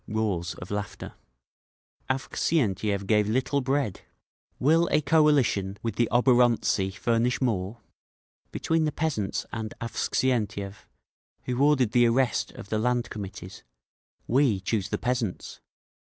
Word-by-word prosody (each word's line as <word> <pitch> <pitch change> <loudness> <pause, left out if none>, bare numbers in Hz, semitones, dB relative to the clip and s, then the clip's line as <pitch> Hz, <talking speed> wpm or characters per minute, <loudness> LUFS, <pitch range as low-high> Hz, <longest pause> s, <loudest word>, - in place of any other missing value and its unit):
Roars 100 -6 -2
of 90 - -10
laughter. 100 -2 -5 1.0
"Avksentiev 105 - 0
gave 105 0 +2
little 130 +4 0
bread. 135 -6 -1 0.6
Will 165 +6 +3
a - - +4
coalition 140 - +2
with 115 -3 -2
the 120 +1 +1
oborontsi 120 -5 +3
furnish 120 +2 +1
more? 110 -2 -2 0.7
Between 160 -1 0
the 150 - 0
peasants 140 -13 -2
and 110 -1 -5
Avksentiev, 110 -4 -2 0.6
who 125 +2 0
ordered 140 -6 +3
the 120 0 +4
arrest 120 0 +1
of 100 - -11
the 110 - 0
Land 120 +1 0
Committees, 95 -2 -8 0.6
we 125 -5 +2
choose 100 +1 -2
the - - -1
peasants! 125 -6 -3
115 Hz, 120 wpm, -26 LUFS, 100-130 Hz, 1.0 s, a